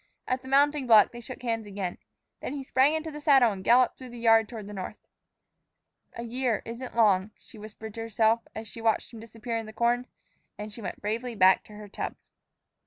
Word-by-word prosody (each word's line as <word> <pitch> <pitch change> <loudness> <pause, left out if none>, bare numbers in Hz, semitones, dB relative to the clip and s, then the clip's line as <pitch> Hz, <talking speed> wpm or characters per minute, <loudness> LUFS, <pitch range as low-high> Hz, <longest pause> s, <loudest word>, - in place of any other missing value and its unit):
At 255 0 -1
the 260 - -12
mounting 285 0 +3
block 220 -3 +7
they 240 - -9
shook 250 +1 -9
hands 225 -3 -2
again. 195 -3 -5 0.4
Then - - -5
he 280 -2 -5
sprang 270 +3 +3
into 315 0 -3
the 300 0 -8
saddle 270 -6 +5
and 190 -2 -7
galloped 245 +3 +4
through 255 -1 -9
the 240 - -10
yard 225 -2 +4
toward 220 -4 -7
the 210 - -9
north. 195 +2 -6 1.2
"A 235 - -6
year 240 -1 -1
isn't 235 +2 -7
long," 205 -4 +3
she 220 - -16
whispered 215 0 -9
to 225 - -6
herself, 225 0 +2
as 220 0 -6
she 230 - -9
watched 225 +1 0
him 225 - -9
disappear 230 +1 -5
in 225 - -7
the 215 - -10
corn, 240 +2 +1 0.5
and 210 0 -7
she 230 - -9
went 195 - -6
bravely 230 +3 -3
back 190 -1 +5
to 210 - -14
her 210 0 -10
tub. 200 - -5
230 Hz, 215 wpm, -27 LUFS, 215-250 Hz, 1.2 s, block